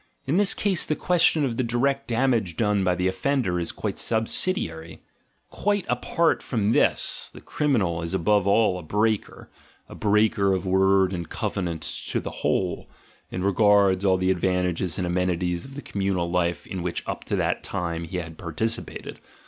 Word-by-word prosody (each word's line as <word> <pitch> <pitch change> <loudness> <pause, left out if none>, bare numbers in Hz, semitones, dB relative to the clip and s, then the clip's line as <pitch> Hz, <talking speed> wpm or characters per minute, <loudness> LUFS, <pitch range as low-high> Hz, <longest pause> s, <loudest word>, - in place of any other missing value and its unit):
In 145 +6 +1
this 200 -1 +2
case 195 -5 +1
the 155 - -1
question 165 -4 +3
of 120 -3 -3
the 130 - +1
direct 135 +4 0
damage 115 -8 +1
done 105 -3 +1
by 90 -1 +2
the 90 +1 0
offender 95 -2 0
is 85 - -3
quite - - -4
sub 110 -1 0
sidiary: 85 - -1 0.5
quite 205 -2 0
apart 170 -1 +1
from 110 -4 0
this - - +1
the - - -12
criminal* 105 - 0
is 85 +3 -3
above 100 +2 +2
all 100 -2 +3
a - - -7
breaker, 105 +6 -1 0.4
a - - -11
breaker 105 -2 +2
of 95 0 -2
word 95 0 +3
and 85 -3 -5
covenant 85 -4 -3 0.2
to - - 0
the - - -6
whole, - - -1 0.4
as 90 - -3
regards 100 -1 +4
all 95 -2 +3
the 95 0 +1
advantages 90 -2 0
and 90 - -1
amenities 90 0 -1
of 135 0 -11
the 145 - -7
communal 95 -3 -1
life 85 -1 0
in 95 - -5
which 85 0 -3
up - - -4
to - - -1
that - - 0
time 85 -1 -3
he 90 +3 -5
had 80 -2 -6
participated. 100 +6 -3
95 Hz, 175 wpm, -25 LUFS, 90-115 Hz, 0.5 s, regards